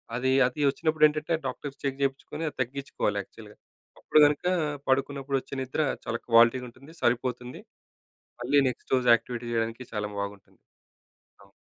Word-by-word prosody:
అది 130 +2 +1 0.2
అది 130 +4 -8
వచ్చినప్పుడేంటంటే 155 +1 +2
డాక్టర్స్‌కి 140 +2 -7
చెక్ 140 0 -2
జేపిచుకొని 135 +3 -2
అది 145 - -17
తగ్గిచుకోవాలి 130 -5 -2
యాక్చువల్‌గా. 105 +1 -14 0.4
అప్పుడు - - +3
కనుక 145 +3 +1 0.4
పడుకున్నప్పుడు 135 0 0
వచ్చే - - -13
నిద్ర 130 +4 -2 0.2
చాలా 115 -1 -2
క్వాలిటీగుంటుంది. 120 +4 +3
సరిపోతుంది. 125 +1 -1 0.8
మళ్ళీ 135 +4 +2
నెక్స్ట్ 125 - -6
రోజు 125 -1 0
యాక్టివిటీ 120 +1 -6
జేయడానికి 115 +1 -2
చాలా 105 -1 -2
బాగుంటుంది. 100 0 -8 0.8
అవును. - - -21
130 Hz, 130 wpm, -27 LUFS, 115-140 Hz, 0.8 s, అప్పుడు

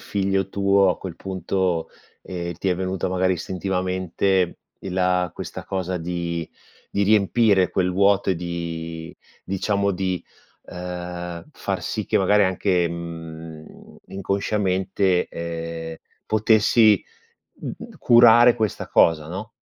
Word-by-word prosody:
figlio 95 -1 -1
tuo, 100 0 +3
a - - -3
quel 95 -4 -7
punto, 95 -2 -2 0.3
ehm, 85 -1 -5
ti 90 +4 -2
è 90 - +2
venuta, 95 +1 -2
magari, 95 0 +1
istintivamente, 95 0 -1 0.2
i - - -7
la 90 -1 +1
questa - - -7
cosa 95 -1 -3
di 85 -1 -3 0.4
di 100 - 0
riempire 100 -1 +3
quel 90 -1 0
vuoto, 100 +1 +3
e - - +2
di 85 -1 -5 0.3
diciamo 100 +1 0
di, 90 -2 -2 0.4
uhm, 90 -1 -6
far - - -3
sì - - -3
che - - +1
magari 105 +2 +4
anche, 90 -1 +1
mhmm, 80 -2 -8 0.4
inconsciamente, 95 -1 0
ehm, 85 -1 -5 0.3
potessi, 110 0 +4 0.6
mhmm, 235 -2 -8
curare 120 0 +7
questa 110 -4 -2
cosa, 80 -2 +3
no? 95 +7 -6
95 Hz, 120 wpm, -23 LUFS, 85-100 Hz, 0.6 s, curare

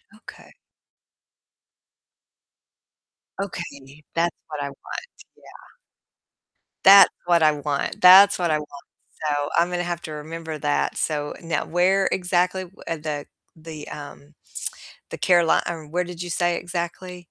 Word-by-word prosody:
Okay. 220 - -15 2.8
Okay, 150 -7 -7
that's 170 0 +1
what 150 -2 -6
I 140 - -3
want, 140 - -8 0.3
yeah. - - -17 1.1
That's 195 +1 +9 0.2
what 170 -2 +3
I 155 - +6
want, 145 -1 -3
that's 190 +2 +8
what 175 -3 +1
I 155 - +2
want, 145 -1 -11 0.4
so 145 0 -1
I'm 175 +1 +3
gonna 175 0 -2
have 175 -1 -4
to 155 - -7
remember 160 +1 -6
that, 145 0 0
so, 145 -2 -2
now 165 -1 -2
where 190 +3 +2
exactly, 180 +1 0 0.2
uh, 165 - -2
the 150 -2 -5 0.3
the, 155 -2 -9
um 145 +1 -10 0.8
the - - -5
Caroli 175 -2 +3
Um, 160 -3 -6
where 180 +1 0
did 175 -1 -8
you 175 - -7
say 175 0 0
exactly? 175 0 -6
170 Hz, 130 wpm, -23 LUFS, 150-180 Hz, 2.8 s, That's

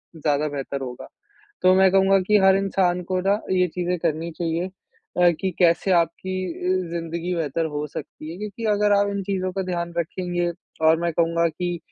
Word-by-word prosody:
ज़्यादा 150 -1 0
बेहतर 140 -1 -4
होगा। 125 -2 -7 0.6
तो 185 0 +6
मैं 190 0 +5
कहूँगा 195 0 +5
कि 210 0 +6
हर 190 0 +6
इंसान 185 -2 +1
को 185 0 +1
ना 200 +3 +1
ये 180 -1 +3
चीज़ें 180 +1 -2
करनी 165 0 -1
चाहिए 170 +1 -1
अ, 180 -1 -1
कि 190 - 0
कैसे 175 +2 +3
आपकी 175 +2 0 0.2
अ, 185 -1 -1
ज़िंदगी 170 +1 -3
बेहतर 165 -1 -1
हो 150 +1 -2
सकती 155 +1 -8
है। 175 - -9
क्योंकि 210 +2 -6
अगर 205 0 +2
आप 200 0 +2
इन 200 0 -2
चीज़ों 185 -1 -2
का 195 +1 -2
ध्यान 170 0 -3
रखेंगे 175 +1 -1 0.4
और 160 +1 +6
मैं 170 0 0
कहूँगा 170 +1 +2
कि 175 +1 -3
175 Hz, 185 wpm, -23 LUFS, 165-190 Hz, 0.6 s, तो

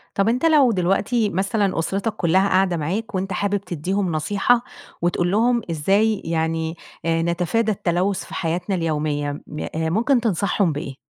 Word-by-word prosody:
طَب 195 +2 +2
أنت 250 +7 0
لو 295 -6 +5
دلوقتي 200 +4 +1
مثلًا 195 0 0
أسرتك 195 +6 -1
كلها 190 +1 +2
قاعدة 185 -2 +2
معاك، 190 +8 -3
وأنت 190 +1 -2
حابب 205 +2 0
تدِّيهم 180 +1 -2
نصيحة، 205 +9 +1 0.4
وتقول 175 +1 +1
لهم 235 +3 +2
إزاي 195 +7 +2
يعني، 160 0 -1 0.3
آآ، 165 0 +1
نتفادى 180 +7 0
التلوث 185 0 0
في - - -12
حياتنا 180 +3 -2
اليومية، 150 -3 -2
م 150 - -7 0.2
آآ، 160 0 0
ممكن 235 - +2
تنصحهم 200 -3 +1
بإيه؟ 145 -2 -5
185 Hz, 150 wpm, -22 LUFS, 165-210 Hz, 0.4 s, لو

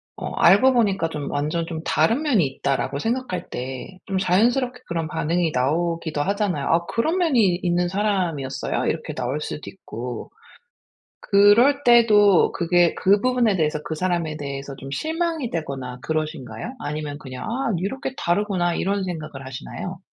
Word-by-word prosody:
어 - - -5
'알고 225 +10 +6
보니까 195 -8 +2
좀 150 -3 -5
완전 150 +4 -1
좀 160 -2 -5
다른 195 - +2
면이 230 - +3
있다.'라고 135 +1 -2
생각할 235 - -2
때 130 +8 -6
좀 195 -1 -2
자연스럽게 245 +7 +2
그런 165 -2 -2
반응이 165 +2 0
나오기도 160 +3 0
하잖아요. 195 -4 -1
아 170 +1 +2
"그런 315 - 0
면이 235 - +3
있는 175 0 +1
사람이었어요?" 175 -10 -1
이렇게 - - -2
나올 - - -3
수도 - - -6
있고. 120 +1 -7 0.9
그럴 230 +8 +5
때도 210 -5 +5
그게 175 -1 +2
그 200 +2 +3
부분에 245 -5 +2
대해서 150 -2 0
그 160 - -3
사람에 170 -3 -1
대해서 140 -1 -6
좀 135 +1 -9
실망이 320 - -2
되거나 135 -6 -4
그러신가요? 155 - -4
아니면 145 0 -4
그냥 130 -3 -8
아 240 +1 -1
'이렇게 260 +9 -4
다르구나.' 175 -1 0
이런 195 0 -1
생각을 155 -6 -6
하시나요? 130 -1 -7
175 Hz, 350 characters per minute, -23 LUFS, 150-215 Hz, 0.9 s, 알고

